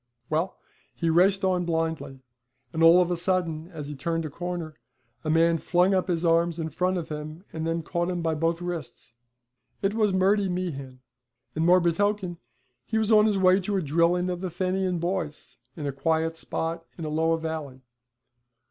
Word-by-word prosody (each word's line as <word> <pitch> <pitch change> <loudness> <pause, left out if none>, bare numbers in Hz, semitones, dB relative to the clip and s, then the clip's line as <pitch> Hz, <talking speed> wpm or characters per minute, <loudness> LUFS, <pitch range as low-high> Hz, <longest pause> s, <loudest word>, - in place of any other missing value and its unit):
Well, 165 +5 0 0.4
he 165 -2 0
raced 190 +4 +4
on 180 -1 +2
blindly, 160 -5 -2 0.5
and 160 - -2
all 170 +2 +8
of 180 - -4
a - - +2
sudden, 170 -3 -1
as 155 -5 -8
he 150 - -5
turned 165 +4 -2
a 155 - -5
corner, 175 -1 -4 0.5
a 155 - -2
man 165 +1 +3
flung 180 +4 +2
up 185 -1 +1
his 175 -1 0
arms 170 0 +2
in 160 -1 -2
front 180 +4 0
of 170 - -5
him, 155 +4 -7
and 160 0 -3
then 165 0 -1
caught 175 +2 -1
him 175 -2 -2
by 165 -1 +1
both 165 +2 -1
wrists. 170 -8 -6 0.7
It 195 +1 +2
was 215 -2 +2
Murty 195 +1 +2
Meehan, 140 -8 -4 0.5
and 160 +1 0
more 180 +1 +7
betoken, 185 +1 0 0.4
he 220 - -2
was 220 0 +1
on 215 0 +6
his 210 -2 +1
way 185 0 +5
to 200 +1 -1
a - - 0
drilling 170 +4 +2
of 180 0 -4
the 185 - -2
Fenian 185 +1 -1
boys 170 -3 -4 0.2
in 150 - -4
a 140 - -1
quiet 160 +3 0
spot 165 0 -3
in 165 - -5
Alloa 160 +2 +1
Valley. 155 -5 -5
170 Hz, 185 wpm, -26 LUFS, 160-185 Hz, 0.7 s, all